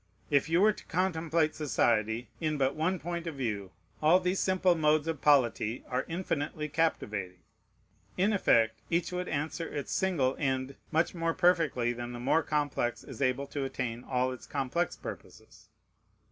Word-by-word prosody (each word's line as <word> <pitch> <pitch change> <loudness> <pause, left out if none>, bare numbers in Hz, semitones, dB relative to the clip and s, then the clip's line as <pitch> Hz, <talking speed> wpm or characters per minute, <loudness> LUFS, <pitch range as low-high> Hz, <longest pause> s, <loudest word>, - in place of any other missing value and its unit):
If 140 +2 +3
you 170 +3 +3
were 215 +1 +5
to - - -13
contemplate 165 -3 +1
society 115 -5 +1
in 155 -2 -1
but 135 0 +2
one 170 +5 0
point 170 0 -4
of 160 - -4
view, 105 -7 -3 0.3
all 160 +4 +6
these 180 +1 0
simple 185 -1 +3
modes 155 -1 +2
of 160 -4 -2
polity 125 -5 +3
are 125 0 -1
infinitely 155 -3 -3
captivating. 105 - -1 0.8
In 200 +4 +3
effect 110 - +3
each 170 +1 0
would 180 0 -3
answer 160 +3 -2
its 145 -2 -5
single 155 -9 +1
end 130 -1 -1 0.2
much 165 +1 +2
more 165 -1 -1
perfectly 165 -10 +2
than 120 0 -6
the 120 - -6
more 135 +6 +2
complex 145 -5 -1
is - - -9
able 130 +1 +1
to 140 0 -4
attain 125 -3 -3
all 130 0 0
its 130 - -9
complex 145 +5 -1
purposes. - - -10
150 Hz, 160 wpm, -30 LUFS, 130-170 Hz, 0.8 s, all